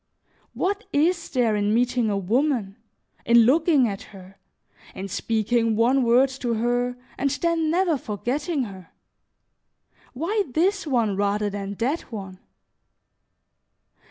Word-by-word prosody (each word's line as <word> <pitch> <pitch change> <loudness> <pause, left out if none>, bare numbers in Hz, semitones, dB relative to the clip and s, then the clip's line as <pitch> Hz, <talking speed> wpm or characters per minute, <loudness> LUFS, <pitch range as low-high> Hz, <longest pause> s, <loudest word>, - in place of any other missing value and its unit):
What 405 +3 -1
is 335 +4 +1
there 240 -5 +1
in 205 +1 +1
meeting 245 -1 +1
a 200 - 0
woman, 220 0 0 0.5
in 235 0 +6
looking 290 +1 +4
at 200 -2 -5
her, 195 0 -14 0.6
in 195 - -5
speaking 225 +3 0
one 245 +5 +3
word 250 +3 +4
to 235 -2 0
her, 245 +2 0 0.2
and 280 +1 +1
then 325 +2 0
never 340 -3 +1
forgetting 270 - -2
her? 190 -6 -10 1.2
Why 390 - -1
this 375 +3 +1
one 230 -7 +1
rather 205 +1 0
than 200 0 -5
that 260 - -2
one? 190 -4 -7
240 Hz, 125 wpm, -24 LUFS, 210-295 Hz, 1.2 s, in